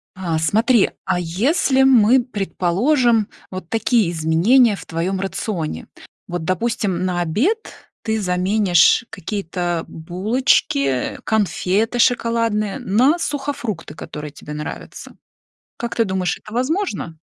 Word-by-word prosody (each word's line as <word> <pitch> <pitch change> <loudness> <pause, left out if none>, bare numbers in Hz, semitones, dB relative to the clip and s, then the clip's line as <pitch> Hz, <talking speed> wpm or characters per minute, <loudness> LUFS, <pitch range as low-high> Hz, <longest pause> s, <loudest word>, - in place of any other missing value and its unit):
А, 175 -4 -2
смотри, 220 - +3 0.2
а 180 - 0
если 260 - +1
мы, 255 -1 +5
предположим, 225 - +1 0.2
вот 185 -2 -7
такие 225 -4 +1
изменения 175 +9 +3
в - - -11
твоём 180 +3 -2
рационе? 185 - -4 0.4
Вот, 175 -2 -4
допустим, 185 -1 -1
на 180 -1 -1
обед 280 - -1 0.3
ты 220 -1 -1
заменишь 185 +2 +3
какие-то 175 -3 -3
булочки, 170 - 0
конфеты 215 +2 0
шоколадные 230 -4 +1
на 255 - +2
сухофрукты, 270 - -4
которые 150 -1 -8
тебе 150 +1 -10
нравятся. 150 0 -8 0.6
Как 235 0 -4
ты 230 - +3
думаешь, 190 -3 -1
это 215 - -12
возможно? 255 - -2
200 Hz, 110 wpm, -20 LUFS, 175-235 Hz, 0.6 s, мы